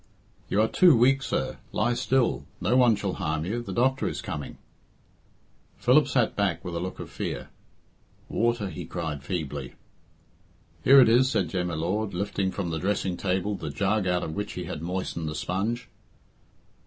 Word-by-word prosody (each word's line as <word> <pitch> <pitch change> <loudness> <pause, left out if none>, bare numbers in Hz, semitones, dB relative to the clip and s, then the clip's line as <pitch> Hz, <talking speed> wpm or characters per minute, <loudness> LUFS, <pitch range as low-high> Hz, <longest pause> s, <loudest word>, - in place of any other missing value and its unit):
"You 100 - +1
are 110 - +3
too 170 +1 +5
weak, 135 +4 +4
sir. - - -2
Lie 120 +3 +1
still. 125 +1 +1
No 110 +7 +1
one 125 -3 +5
shall 100 -2 -3
harm 80 -4 -2
you. 115 +6 -2
The 120 - -7
doctor 130 +2 +1
is - - -3
coming." 75 - -6 1.2
Philip - - +4
sank - - +1
back - - 0
with 90 -1 -4
a - - -1
look 90 +2 -5
of - - -7
fear. - - -4 0.8
"Water," 115 -3 0
he 90 - -6
cried 80 -5 -4
feebly. 75 -5 -4 1.1
"Here 135 +1 +8
it - - +6
is," 125 +3 +5
said 95 - 0
Jem 90 0 -1
y 85 - -3
Lord, 95 +5 -1
lifting 100 0 -1
from 95 -3 -3
the 80 - -2
dressing 95 -1 -1
table 95 +3 -1
the 80 -6 -5
jug 95 +7 0
out 90 -1 +1
of 80 - -4
which 105 +3 -4
he 90 - -5
had 85 -3 -6
moistened 85 -2 -3
the 75 - -5
sponge. 100 +10 -2
95 Hz, 180 wpm, -27 LUFS, 85-115 Hz, 1.2 s, Here